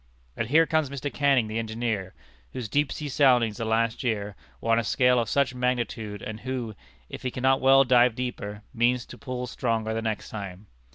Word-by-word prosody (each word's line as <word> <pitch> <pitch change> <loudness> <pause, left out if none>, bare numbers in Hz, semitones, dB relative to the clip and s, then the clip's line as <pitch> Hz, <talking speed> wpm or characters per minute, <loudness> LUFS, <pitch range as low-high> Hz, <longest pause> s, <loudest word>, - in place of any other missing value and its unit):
And 115 - -2
here 160 +6 +5
comes 155 -3 +1
Mr. 140 +1 -5
Canning, 140 -5 +3
the 110 +1 -3
engineer, 110 -4 -3 0.4
whose 120 -3 -4
deep 145 +5 +1
sea 150 - -4
soundings, 125 -6 +3
the 115 - -3
last 115 +2 0
year, 105 -4 -2 0.2
were 115 - -1
on 115 - +4
a - - -1
scale 125 +2 +3
of 115 -3 -1
such 140 -2 +1
magnitude, 120 -5 -2
and 110 0 -6
who, 125 -3 -4 0.3
if - - -8
he 130 - -2
cannot 130 +2 +1
well 135 +1 +6
dive 125 -2 +4
deeper, 105 -4 -5
means 120 0 +1
to - - -11
pull 125 -2 -4
stronger 115 -2 -1
the 115 - -2
next 110 -2 -3
time. 100 -2 -7
120 Hz, 195 wpm, -26 LUFS, 110-130 Hz, 0.4 s, well